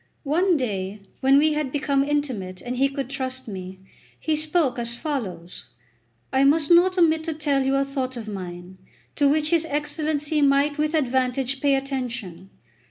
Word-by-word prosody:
One 340 +4 +2
day, 200 -5 -3 0.2
when 270 +1 +5
we 305 +2 +4
had 300 -3 -2
become 280 -1 +1
intimate 255 -11 -2
and 245 +4 -5
he 275 +2 +3
could 275 -2 -4
trust 260 -1 -5
me, 190 -2 -7 0.4
he 315 - 0
spoke 305 -4 +1
as 235 0 -2
follows: 195 - -5 0.7
"I 265 +1 +4
must 295 +3 +3
not 365 +2 +5
omit 320 -2 +3
to 320 - -3
tell 290 -3 +1
you 270 +1 +1
a 275 0 +2
thought 260 -2 -3
of 225 -2 -7
mine, 185 -2 -7 0.4
to 285 -1 +3
which 305 +2 +2
his 335 -1 +3
Excellency 300 +1 -1
might 285 +1 +3
with 305 +1 +1
advantage 260 -1 0
pay 280 -1 +3
attention. 245 -9 -4
275 Hz, 165 wpm, -24 LUFS, 240-300 Hz, 0.7 s, when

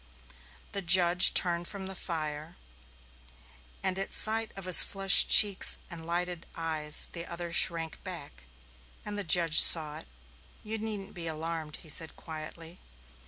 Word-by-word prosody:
The 200 - -6
judge 180 0 +5
turned 175 -1 +3
from 200 -2 -9
the 190 - -9
fire, 155 -2 -8 1.3
and 190 0 -3
at 195 - -5
sight 225 +1 0
of 195 -2 -11
his 185 -2 +8
flushed 195 0 +4
cheeks 205 -3 +5
and 165 -1 -10
lighted 175 0 -6
eyes 155 -2 -2
the 170 0 -7
other 170 0 -8
shrank 165 -2 -1
back, 170 - -9 0.6
and 210 - -7
the 205 - -6
judge 165 -2 +2
saw 155 -2 +3
it. - - -17 0.6
"You 220 +1 -8
needn't 210 -2 -7
be 170 -1 -8
alarmed," 160 -1 -7
he 160 - -12
said 160 +1 -2
quietly. 160 +2 -12
170 Hz, 145 wpm, -26 LUFS, 160-190 Hz, 1.3 s, his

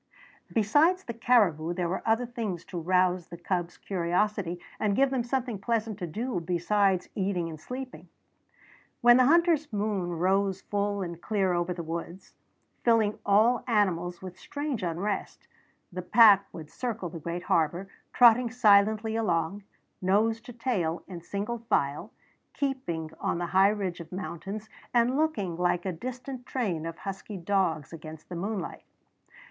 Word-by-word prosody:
Besides 295 - +3
the 235 - -5
caribou 195 -9 +2
there 175 -1 -1
were 180 - -2
other 225 +2 +2
things 225 -8 -4
to 175 - -5
rouse 180 0 +2
the 170 - -9
cubs' 175 0 -3
curiosity 180 0 -1 0.2
and 205 -2 +1
give 270 +2 +3
them 260 -3 0
something 245 -3 -2
pleasant 220 -1 -1
to 175 - -3
do 220 +4 -3
besides 180 +2 +1
eating 190 -3 -1
and 155 -2 -8
sleeping. 255 +4 -7 0.9
When 240 0 +7
the 255 - +5
hunter's 330 -2 +3
moon 205 -4 -1
rose 190 +3 +1
full 205 -1 -1
and 170 -1 -7
clear 195 -4 +1
over 175 +1 0
the 170 -1 -4
woods, 170 +3 -6 0.5
filling 225 -3 +3
all 220 +4 +4
animals 180 -6 0
with 185 0 -9
strange 285 -5 -4
unrest, 185 +4 -3 0.5
the 180 - -3
pack 200 +1 +6
would 155 -3 -10
circle 225 -7 -4
the 165 0 -8
great 170 +3 -4
harbor, 170 +4 +1 0.2
trotting 240 0 +6
silently 220 -1 +4
along, 185 -3 0 0.4
nose 215 +5 +2
to 245 - -10
tail 185 -9 -1
in 175 -3 -8
single 205 +6 -4
file, 145 -11 -1 0.4
keeping 255 - -3
on - - -1
the 175 - -2
high 190 +1 +6
ridge 195 -4 -2
of 170 - -10
mountains 195 +3 -6 0.3
and 240 +2 +3
looking 250 - 0
like 175 0 +1
a 190 - 0
distant 250 +6 -7
train 180 -11 -2
of 165 - -6
husky 195 +1 -6
dogs 170 -5 0
against 160 -1 -10
the 180 - -5
moonlight. 195 +1 -4
200 Hz, 155 wpm, -28 LUFS, 175-230 Hz, 0.9 s, When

